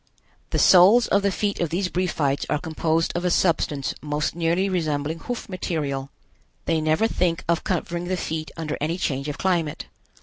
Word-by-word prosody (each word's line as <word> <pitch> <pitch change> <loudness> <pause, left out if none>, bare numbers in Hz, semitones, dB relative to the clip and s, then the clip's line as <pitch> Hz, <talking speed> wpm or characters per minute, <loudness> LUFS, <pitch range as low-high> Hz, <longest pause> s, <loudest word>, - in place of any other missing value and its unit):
The - - -1
soles 195 +6 +7
of 200 - +3
the 200 0 +1
feet 200 +1 -1
of 170 - 0
these 180 +4 0
Briefites 160 -6 -1
are - - +2
composed 160 +1 0
of 175 - -1
a 180 - +2
substance 155 -5 +1
most 150 +1 -2
nearly 170 +3 +1
resembling 160 -4 -1
hoof 245 +8 -5
material. 145 -7 -3 0.6
They 165 -1 +1
never 155 +7 +2
think 180 -5 0
of 170 0 +1
covering 175 -1 -2
the 185 +1 -1
feet 160 -2 -4
under 155 -2 -4
any 160 +4 -1
change 140 -4 -2
of 145 - -5
climate. 170 -5 -1
165 Hz, 175 wpm, -24 LUFS, 155-180 Hz, 0.6 s, soles